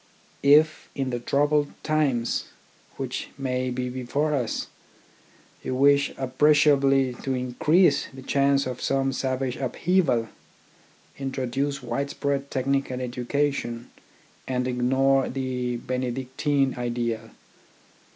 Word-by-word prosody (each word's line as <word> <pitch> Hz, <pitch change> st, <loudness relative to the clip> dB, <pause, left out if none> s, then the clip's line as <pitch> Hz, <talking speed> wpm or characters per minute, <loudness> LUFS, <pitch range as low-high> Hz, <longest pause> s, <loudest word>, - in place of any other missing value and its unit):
If, 155 Hz, +2 st, +4 dB
in 135 Hz, -2 st, -2 dB
the 120 Hz, -, -2 dB
troubled 145 Hz, +3 st, +1 dB
times 140 Hz, -7 st, 0 dB, 0.5 s
which -, -, -4 dB
may 130 Hz, -1 st, -1 dB
be 125 Hz, 0 st, -2 dB
before 130 Hz, +4 st, -1 dB
us, 125 Hz, -6 st, -1 dB, 1.0 s
you 130 Hz, -, -3 dB
wish 140 Hz, +1 st, +4 dB
appre 135 Hz, +3 st, +3 dB
ciably 135 Hz, -3 st, +3 dB
to 135 Hz, -1 st, -1 dB
increase 140 Hz, +6 st, +2 dB
the 130 Hz, 0 st, -11 dB
chance 140 Hz, 0 st, +2 dB
of 125 Hz, -1 st, -5 dB
some 135 Hz, 0 st, +1 dB
savage 130 Hz, -1 st, -2 dB
upheaval, 135 Hz, -4 st, +1 dB, 0.9 s
introduce 135 Hz, +1 st, -2 dB
widespread 140 Hz, +3 st, -2 dB
technical 135 Hz, 0 st, -1 dB
educa 130 Hz, +3 st, -1 dB
tion 120 Hz, -3 st, -6 dB, 0.6 s
and 125 Hz, -1 st, -1 dB
ignore 130 Hz, +2 st, +2 dB
the 125 Hz, -2 st, -2 dB
Benedictine 130 Hz, +2 st, -1 dB
ideal. 120 Hz, -2 st, -2 dB
130 Hz, 105 wpm, -25 LUFS, 125-140 Hz, 1.0 s, If